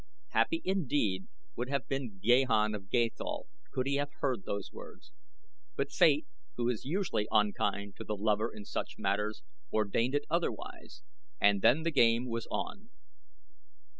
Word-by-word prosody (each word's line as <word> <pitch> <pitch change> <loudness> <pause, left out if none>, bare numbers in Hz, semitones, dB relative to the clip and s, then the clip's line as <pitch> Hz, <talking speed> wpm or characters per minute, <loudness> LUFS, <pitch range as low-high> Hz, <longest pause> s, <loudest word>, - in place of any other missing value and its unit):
Happy 330 -1 +2
indeed 145 - +1 0.3
would 120 +2 -3
have 140 -1 -1
been 130 -7 -3
Gahan 115 -1 +4
of 95 -2 -7
Gathol 120 0 0 0.3
could 130 - -1
he 140 +1 +1
have 145 0 -1
heard 125 -8 -1
those 100 -1 -3
words; 315 - -12 0.6
but - - -1
Fate, 300 - +4 0.3
who 120 -1 0
is 120 -4 -2
usually 165 - 0
unkind 100 -1 +1
to - - -6
the 105 - -3
lover 105 +1 +1
in 105 - -9
such - - -4
matters, 105 +2 -1 0.3
ordained 110 +5 +1
it 145 - 0
otherwise, 175 - -3 0.4
and 100 -1 +4
then 145 +10 +5
the 165 - +1
game 120 -3 +4
was 115 -1 -3
on. 210 +3 -4
120 Hz, 150 wpm, -32 LUFS, 105-140 Hz, 0.6 s, then